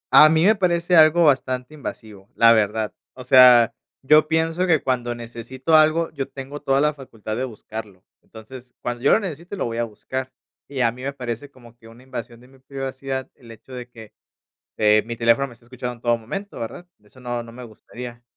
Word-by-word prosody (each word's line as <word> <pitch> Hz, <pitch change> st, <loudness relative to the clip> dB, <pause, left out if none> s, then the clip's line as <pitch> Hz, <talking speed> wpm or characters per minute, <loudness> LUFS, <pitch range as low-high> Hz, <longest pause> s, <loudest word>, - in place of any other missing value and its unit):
A 155 Hz, -, +9 dB
mí 160 Hz, +2 st, +3 dB
me 215 Hz, -, +6 dB
parece 175 Hz, -2 st, +1 dB
algo 160 Hz, +1 st, +6 dB
bastante 130 Hz, -2 st, +1 dB
invasivo, 110 Hz, -9 st, -9 dB
la 115 Hz, 0 st, +6 dB
verdad, 110 Hz, 0 st, 0 dB, 0.2 s
o 130 Hz, -, -9 dB
sea, 125 Hz, -2 st, +7 dB, 0.3 s
yo 155 Hz, +3 st, +5 dB
pienso 165 Hz, +3 st, 0 dB
que 160 Hz, -4 st, +2 dB
cuando 120 Hz, -2 st, -1 dB
necesito 120 Hz, +5 st, -5 dB
algo, 155 Hz, +2 st, +4 dB
yo 140 Hz, -3 st, -4 dB
tengo 140 Hz, +2 st, -8 dB
toda 135 Hz, -1 st, +1 dB
la 150 Hz, +1 st, +2 dB
facultad 115 Hz, -6 st, -8 dB
de 130 Hz, +3 st, -2 dB
buscarlo, 110 Hz, -4 st, -9 dB, 0.2 s
entonces, 120 Hz, +3 st, -13 dB
cuando 120 Hz, 0 st, -4 dB
yo 140 Hz, -, +4 dB
lo -, -, +4 dB
necesite, 175 Hz, -1 st, -6 dB
lo -, -, -2 dB
voy 115 Hz, -1 st, -4 dB
a 120 Hz, -, +1 dB
buscar 130 Hz, +4 st, -6 dB, 0.4 s
y 135 Hz, -2 st, -3 dB
a 115 Hz, -2 st, +3 dB
mí 125 Hz, +2 st, -12 dB
me 140 Hz, +2 st, -4 dB
parece 125 Hz, +1 st, -6 dB
como 120 Hz, -4 st, -18 dB
que 115 Hz, -1 st, -18 dB
una 115 Hz, +2 st, -16 dB
invasión 120 Hz, -2 st, -8 dB
de 125 Hz, -, -18 dB
mi 135 Hz, 0 st, -21 dB
privacidad, 135 Hz, 0 st, -5 dB
el 120 Hz, -, -18 dB
hecho 115 Hz, +3 st, -14 dB
de 125 Hz, -1 st, -8 dB
que, 110 Hz, -3 st, -14 dB, 0.6 s
eh, 105 Hz, 0 st, +4 dB
mi 115 Hz, -, -4 dB
teléfono 115 Hz, +4 st, +2 dB
me 125 Hz, -, -13 dB
está 115 Hz, 0 st, -23 dB
escuchando 125 Hz, 0 st, -6 dB
en 115 Hz, -, -21 dB
todo 120 Hz, -1 st, +1 dB
momento, 195 Hz, -, -7 dB
¿verdad?, 175 Hz, +10 st, -7 dB, 0.2 s
eso 105 Hz, +5 st, -20 dB
no, 120 Hz, -1 st, -4 dB
no 115 Hz, 0 st, -11 dB
me 125 Hz, +2 st, -10 dB
gustaría, 120 Hz, +1 st, -10 dB
125 Hz, 210 wpm, -22 LUFS, 115-140 Hz, 0.6 s, A